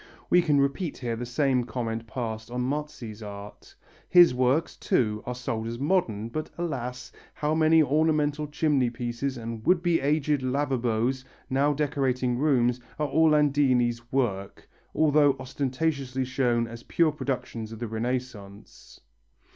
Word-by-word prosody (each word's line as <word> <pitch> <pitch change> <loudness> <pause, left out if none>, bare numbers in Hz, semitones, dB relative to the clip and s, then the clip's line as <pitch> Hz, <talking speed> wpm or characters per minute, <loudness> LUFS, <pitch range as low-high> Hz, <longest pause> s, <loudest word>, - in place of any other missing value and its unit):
We 180 - +6
can 150 -4 +2
repeat 140 +4 -1
here 120 -3 -3
the 120 +1 -5
same 130 0 +1
comment 115 -1 -4
passed 110 -1 -5
on 125 +1 -3
Marzi's 125 -5 -4
art: 100 -1 -10 0.3
his 175 -5 +7
works, 130 +6 +1
too, 105 -3 0
are 125 - -3
sold 115 -3 -3
as 115 +1 -4
modern, 125 - 0
but, 155 +5 -4
alas, 130 -7 -4 0.2
how 150 +1 -1
many 160 0 +5
ornamental 150 0 +1
chimneypieces 130 -3 -1
and 115 -1 -6
would 175 +3 +3
be 175 -2 +2
aged 145 0 +1
lavabos 130 -2 0 0.3
now 140 +3 +3
decorating 130 -4 0
rooms, 125 -4 +2 0.2
are 150 -1 -1
Orlandini's 140 -7 +2
work, 100 -8 -2 0.3
although 150 -2 +4
ostentatiously 130 0 -2
shown 120 -2 +1
as 115 0 -9
pure 165 +5 +2
productions 125 -6 -4
of 115 - -7
the 120 +1 -4
Renaissance. 110 -3 -6
130 Hz, 135 wpm, -27 LUFS, 120-150 Hz, 0.3 s, his